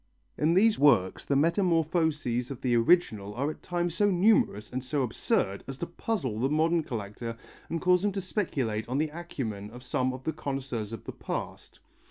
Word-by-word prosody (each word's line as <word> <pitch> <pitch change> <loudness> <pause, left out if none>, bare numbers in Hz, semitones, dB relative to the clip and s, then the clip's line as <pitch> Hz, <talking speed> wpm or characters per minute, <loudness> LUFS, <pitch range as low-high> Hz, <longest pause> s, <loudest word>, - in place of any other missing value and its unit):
In 160 +3 +2
these 215 +3 +4
works 120 -11 +4
the 140 - +1
metamorphoses 160 - +1
of 135 -3 -7
the 125 -2 +2
original 115 - +2
are 140 +5 0
at - - -12
times 175 -1 -1
so 205 +3 +3
numerous 180 - +3
and 130 0 -3
so 135 +1 0
absurd 100 -4 0
as 135 -1 -6
to 170 - -3
puzzle 170 - -3
the 130 +3 +1
modern 160 +3 +2
collector 115 -3 -5 0.3
and 165 - -1
cause 180 +1 +3
him 205 - +2
to 195 - -2
speculate 135 - -2
on 130 - 0
the 155 +1 +1
acumen 130 -11 -5
of 125 +3 -11
some 130 0 0
of 130 0 -8
the 160 - -1
connoisseurs 130 -6 -4
of 115 - -7
the - - -6
past. - - -6
140 Hz, 190 wpm, -29 LUFS, 115-170 Hz, 0.3 s, these